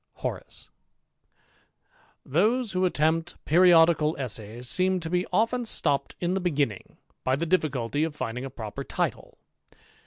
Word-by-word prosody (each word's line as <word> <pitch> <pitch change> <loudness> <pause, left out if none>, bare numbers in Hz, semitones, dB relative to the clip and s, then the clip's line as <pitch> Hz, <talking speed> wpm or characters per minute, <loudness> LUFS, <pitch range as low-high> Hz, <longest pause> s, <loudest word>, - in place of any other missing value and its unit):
HoK, - - -4 1.8
'X'HOSE 215 - +1
who 185 0 +1
attempt 165 0 0
periodical 165 -2 +5
essays 120 -2 -4
seem 185 +6 +2
to 165 -1 -6
be 180 +1 0
o\ 215 +5 +3
^ 245 0 -4
stopped 140 -9 -1
in 175 +1 -1
the 190 - -1
begimiing, 145 - -2 0.3
by 130 - +2
the 160 +5 -2
difficulty 150 -6 0
of 160 -2 -3
finrlir^ 125 +1 -4
a - - -5
proper 110 -5 -7
title. - - -3
160 Hz, 135 wpm, -26 LUFS, 135-185 Hz, 1.8 s, periodical